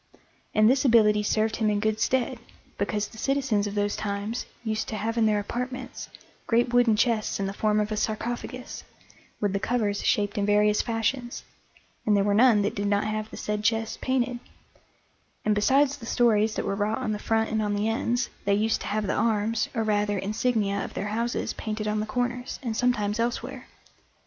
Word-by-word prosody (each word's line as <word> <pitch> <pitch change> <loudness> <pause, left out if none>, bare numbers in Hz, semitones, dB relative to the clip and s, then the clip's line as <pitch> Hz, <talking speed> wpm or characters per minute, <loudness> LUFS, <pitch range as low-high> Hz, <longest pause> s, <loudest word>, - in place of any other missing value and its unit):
And 215 0 +6
this 260 +3 +3
ability 215 -5 +5
served 215 +1 0
him 215 -2 +1
in 205 -1 +1
good 215 0 0
stead, 255 0 0 0.4
because 205 +1 -1
the 220 - -13
citizens 260 -7 +1
of 205 - -5
those 205 0 0
times 205 +3 -3 0.2
used 220 -1 -2
to 220 - -4
have 220 +2 -2
in 225 -2 +3
their 210 -1 +2
apartments 250 +4 -5 0.4
great 240 +1 +2
wooden 245 -3 +5
chests 220 -2 +1
in 195 - 0
the 195 - -3
form 215 +1 +1
of 210 0 -1
a - - 0
sarcophagus, 240 +4 -4 0.6
with 205 -2 0
the 200 - 0
covers 210 -3 0
shaped 205 0 +1
in 200 - +1
various 210 0 +4
fashions, 240 +2 -2 0.6
and 210 -1 +3
there 200 - +3
were 205 0 +2
none 220 -1 +5
that 205 - 0
did 205 0 -2
not 205 0 +2
have 215 0 -3
the - - -9
said 210 0 -3
chests 225 0 0
painted; 250 -1 0 1.1
and 215 - +3
besides 270 +7 +3
the 230 -5 -10
stories 220 -3 +3
that - - -2
were - - -1
wrought 210 +2 0
on 215 - -2
the 210 - -2
front 225 0 0
and 220 0 +1
on 205 -1 0
the 205 +1 0
ends, 235 +2 0
they 200 0 +3
used 215 +2 +1
to - - -5
have 215 +1 -1
the 195 - 0
arms, 220 0 +1
or 225 - +1
rather, 205 -1 +1
insignia 205 0 0
of - - -8
their 205 - -3
houses 235 +3 -1
painted 215 -1 -4
on 210 0 0
the 215 - -2
corners, 245 +1 -2
and 230 -3 -2
sometimes 220 -3 +1
elsewhere. 235 +1 -3
215 Hz, 200 wpm, -26 LUFS, 210-235 Hz, 1.1 s, And